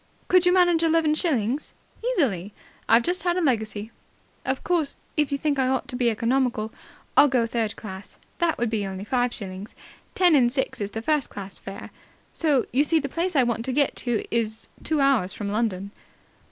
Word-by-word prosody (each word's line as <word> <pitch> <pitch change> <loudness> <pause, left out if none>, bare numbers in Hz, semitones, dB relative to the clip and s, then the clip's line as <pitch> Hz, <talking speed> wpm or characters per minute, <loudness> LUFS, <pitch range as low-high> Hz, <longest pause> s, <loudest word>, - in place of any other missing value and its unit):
Could 365 -1 +5
you - - +6
manage 350 -2 +4
eleven 325 -2 +3
shillings?" 280 - -1 0.3
"Easily. 235 - 0 0.3
I've 230 +1 +6
just 360 +5 -1
had 350 0 0
a - - +2
legacy." 220 - -1 0.5
"Of 260 0 -2
course, 330 -5 0 0.2
if 300 -2 +1
you 280 - +1
think 285 -1 0
I 260 - +2
ought 260 0 0
to - - -4
be 245 -1 +2
economical, 235 -1 0 0.4
I'll - - +8
go 250 -4 +2
third 225 -2 -2
class. 190 -2 -9 0.2
That 340 -2 +1
would 235 -1 -1
only 200 -3 -2
be 190 - -6
five 245 +2 0
shillings. 195 0 -7 0.4
Ten 360 -3 +5
and 245 -5 +4
six 265 -4 -2
is 200 - -2
the 225 +2 -6
first 300 -1 +1
class 195 -1 -7
fare. 195 0 -9 0.4
So 295 -6 +2
you 275 +3 +4
see 320 +1 +2
the 280 -2 -4
place 340 +4 -2
I 265 - +5
want 235 -1 -1
to 265 - -1
get 280 +1 +1
to 240 -3 -1
is 225 -1 -2
two 310 -2 +1
hours 260 -9 +2
from 200 -2 -4
London." 200 -3 -1
250 Hz, 195 wpm, -25 LUFS, 220-305 Hz, 0.5 s, I'll